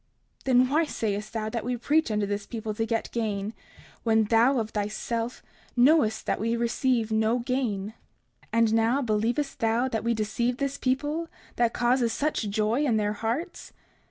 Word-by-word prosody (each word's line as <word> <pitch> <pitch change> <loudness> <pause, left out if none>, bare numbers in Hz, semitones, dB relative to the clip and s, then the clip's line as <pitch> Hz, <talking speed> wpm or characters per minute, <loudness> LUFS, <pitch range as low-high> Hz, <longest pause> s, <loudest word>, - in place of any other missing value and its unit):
30:35 - - -24
Then 255 -1 +4
why 310 +4 +3
sayest 210 -6 -3
thou 220 -1 -2
that 230 -1 -3
we 245 0 -2
preach 300 +5 +2
unto 210 -1 0
this 200 0 -3
people 220 -2 -4
to 225 +1 -2
get 225 -1 -2
gain, 215 -2 -2 0.5
when 220 -1 +3
thou, 230 +5 +4
of 220 -2 -2
thyself, 225 +3 -3 0.3
knowest 245 -4 +4
that - - 0
we 230 +2 0
receive 235 -1 0
no 220 +2 +2
gain? 235 -5 -2 0.6
And 230 -1 +3
now, 230 +5 +2
believest 235 +5 -1
thou 230 +3 +2
that 225 -3 -2
we 235 0 +1
deceive 235 +3 -1
this 275 0 -2
people, 295 +6 -1 0.3
that 235 -1 +2
causes 240 -1 +2
such 280 -5 -1
joy 215 +6 +1
in 240 -7 +2
their 210 0 0
hearts? 235 - -4
230 Hz, 170 wpm, -27 LUFS, 220-255 Hz, 0.6 s, Then